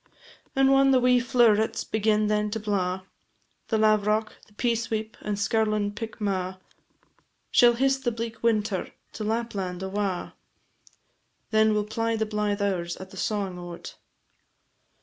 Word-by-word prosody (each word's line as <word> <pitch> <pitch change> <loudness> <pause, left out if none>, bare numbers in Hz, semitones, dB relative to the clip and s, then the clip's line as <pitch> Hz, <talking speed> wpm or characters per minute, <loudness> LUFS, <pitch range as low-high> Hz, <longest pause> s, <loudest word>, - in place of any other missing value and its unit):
And 270 0 +4
whan 270 0 +5
the 260 -1 +5
wee 250 0 +4
flow'rets 235 -4 +3
begin 215 0 +1
then 210 0 +1
to 220 +2 -3
blaw, 190 -3 -1 0.6
The 220 - +1
lavrock, 215 0 +2
the 210 - -24
peasweep, 225 -1 -1
and 210 -1 -3
skirlin' 215 0 0
pickmaw, 200 -4 -3 0.9
Shall 240 -1 +6
hiss 270 +3 +2
the 255 -3 -1
bleak 230 0 -5
winter 215 -4 0 0.2
to 220 - -5
Lapland 205 -5 -2
awa, 190 -1 -2 1.2
Then 220 0 +4
we - - +2
'll - - -3
ply 225 +2 -1
the 220 0 0
blythe 210 -1 -1
hours 175 -4 -1
at 190 0 -10
the - - -11
sawin' 195 -4 -2
o't. 175 -1 -8
215 Hz, 140 wpm, -26 LUFS, 200-230 Hz, 1.2 s, Shall